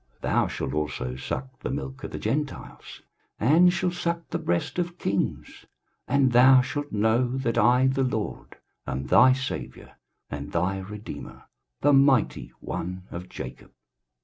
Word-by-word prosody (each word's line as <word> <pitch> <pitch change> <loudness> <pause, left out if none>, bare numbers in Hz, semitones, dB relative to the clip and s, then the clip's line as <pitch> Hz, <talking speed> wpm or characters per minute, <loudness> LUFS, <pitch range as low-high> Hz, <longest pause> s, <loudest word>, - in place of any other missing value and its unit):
23:060:016 - - -1
Thou - - +3
shalt - - -4
also 75 -4 -2
suck 130 - -5
the - - -4
milk 135 0 -5
of - - -4
the - - -6
Gentiles, 150 0 -4 0.4
and 165 +10 +5
shalt 175 0 -1
suck 170 -1 -2
the - - -1
breast 85 - -1
of 175 0 -2
kings: 100 - -3 0.4
and 135 -1 +3
thou 130 +2 +7
shalt 145 +3 -4
know 115 +4 +1
that 120 -4 0
I 125 +2 +4
the 135 +1 +1
LORD 110 -5 -4 0.3
am 70 0 -3
thy 130 - +6
Saviour 130 0 -6 0.3
and 70 0 -6
thy 90 +3 0
Redeemer, 105 +2 -8 0.4
the 145 0 +4
mighty 135 - +3
One 90 +2 -5
of 90 +1 -7
Jacob. - - -9
130 Hz, 150 wpm, -26 LUFS, 95-140 Hz, 0.4 s, thou